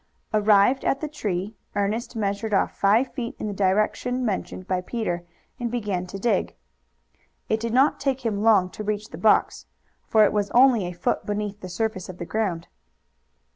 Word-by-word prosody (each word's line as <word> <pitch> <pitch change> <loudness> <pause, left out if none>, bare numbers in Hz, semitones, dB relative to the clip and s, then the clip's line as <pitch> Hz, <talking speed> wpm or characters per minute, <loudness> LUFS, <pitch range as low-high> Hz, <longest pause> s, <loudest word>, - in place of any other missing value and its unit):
Arrived 210 +4 +4
at 275 - +1
the 310 - -3
tree, 205 -7 -3 0.2
Ernest 220 +5 -1
measured 205 0 -1
off - - +1
five 220 +6 +2
feet 235 -3 -4
in - - -5
the 210 - -3
direction 215 +6 0
mentioned 190 -3 -3
by 185 -2 0
Peter 180 -4 -3 0.4
and 240 -1 -2
began 205 -6 -2
to 195 - -7
dig. 235 +5 0 0.9
It 220 - +1
did 230 0 -3
not 265 +5 +3
take 265 -2 -1
him 205 -3 0
long 205 -5 +4
to 215 - -7
reach 210 0 -3
the 160 - -8
box, 215 +3 +2 0.4
for 220 -1 +5
it - - +1
was 205 -1 0
only 245 -6 +5
a - - -4
foot 175 0 -2
beneath 205 -1 -3
the 185 - -7
surface 210 -1 -3
of 185 - -8
the 175 - -5
ground. 190 -5 -2
210 Hz, 180 wpm, -24 LUFS, 195-230 Hz, 0.9 s, for